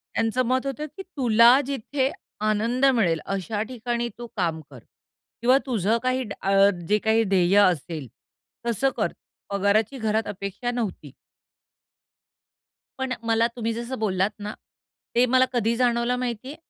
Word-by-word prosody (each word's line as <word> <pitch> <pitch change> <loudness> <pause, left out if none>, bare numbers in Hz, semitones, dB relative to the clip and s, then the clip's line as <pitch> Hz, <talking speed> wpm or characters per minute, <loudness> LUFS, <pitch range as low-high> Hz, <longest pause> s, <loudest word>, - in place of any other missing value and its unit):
त्यांचं 225 +3 +1
मत 255 +2 0
होतं 295 +3 -3
की 385 - -6
तुला 245 - +5
जिथे 270 0 -1 0.4
आनंद 230 +5 +1
मिळेल 170 -8 +2
अशा 195 +2 -3
ठिकाणी 240 -1 -2
तू 240 0 -7
काम 165 -3 -1
कर 130 -4 -12 0.6
किंवा 250 +3 +5
तुझं 225 -3 +1
काही 255 0 +1
ड 210 - -6
अ, 195 +1 +1 0.4
जे 210 - +4
काही 220 +1 +2
ध्येय 190 -1 +3
असेल, 165 -6 +1 0.6
तसं 270 +4 +1
कर. - - 0 0.4
पगाराची 200 +5 +1
घरात 220 -2 0
अपेक्षा 200 +4 -4
नव्हती. 205 - -4 1.9
पण 265 -1 -1
मला 230 0 +2
तुम्ही 230 -1 -2
जसं 235 +1 -5
बोललात 195 -2 +1
ना, 205 +1 -5 0.6
ते 245 - +5
मला 255 +1 +4
कधी 235 -1 +1
जाणवलं 240 0 +1
माहितीय? 250 +3 -4
230 Hz, 140 wpm, -24 LUFS, 200-250 Hz, 1.9 s, तुला